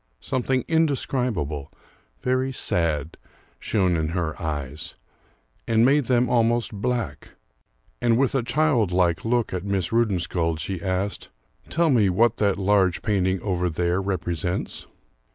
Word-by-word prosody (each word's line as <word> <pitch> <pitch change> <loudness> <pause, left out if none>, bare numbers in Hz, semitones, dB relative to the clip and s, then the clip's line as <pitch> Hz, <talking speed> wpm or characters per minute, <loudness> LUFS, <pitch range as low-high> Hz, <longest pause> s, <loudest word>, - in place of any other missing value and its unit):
Something 130 -1 -1
indescribable, 125 - 0 0.5
very 130 +1 +1
sad, 80 - -1 0.4
shone 95 -4 +1
in 80 -1 0
her 80 -3 -1
eyes, 75 +1 -4 0.7
and 115 0 +4
made 140 +1 +4
them 125 0 +2
almost 120 -1 +1
black; 120 +4 -3 0.7
and 120 -1 +3
with 135 0 +2
a 135 - +2
childlike 110 - +1
look 120 -2 0
at 90 -1 -3
Miss 100 -4 -1
Rudensköld 90 -7 0
she 90 +3 -4
asked, 95 +2 -2 0.4
"Tell 165 -1 +2
me 110 -6 +4
what 115 +5 +3
that 100 -3 +1
large 95 -2 +2
painting 95 -3 +1
over 90 -3 0
there 85 +3 0
represents." 90 -2 -3
100 Hz, 125 wpm, -24 LUFS, 85-120 Hz, 0.7 s, and